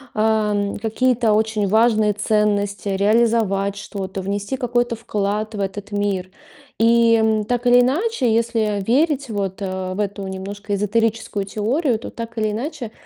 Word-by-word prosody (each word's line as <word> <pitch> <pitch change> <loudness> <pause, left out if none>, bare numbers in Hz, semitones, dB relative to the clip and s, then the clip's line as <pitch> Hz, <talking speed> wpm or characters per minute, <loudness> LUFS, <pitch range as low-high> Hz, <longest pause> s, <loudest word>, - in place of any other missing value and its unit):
эм, 210 -2 +1
какие-то 230 +1 +1
очень 215 -1 +1
важные 220 0 +3
ценности, 205 -2 0
реализовать 200 -1 +2
что-то, 195 -1 -5
внести 205 +6 -3
какой-то 240 -1 0
вклад 210 0 -2
в 205 - -5
этот 200 +1 -4
мир. 200 -2 -2 0.5
И, 230 0 +5
м, 220 -1 +2
так 245 +1 -1
или 245 0 +7
иначе, 270 - +1
если 225 -3 0
верить 280 - +1
вот, 200 -2 -3
э, 185 -1 -3
в 190 - -6
эту 200 -1 -3
немножко 200 +2 -5
эзотерическую 215 0 -1
теорию, 230 - 0
то, - - -7
так 230 0 -8
или 215 -1 +1
иначе, 250 +1 -5
215 Hz, 140 wpm, -21 LUFS, 200-230 Hz, 0.5 s, или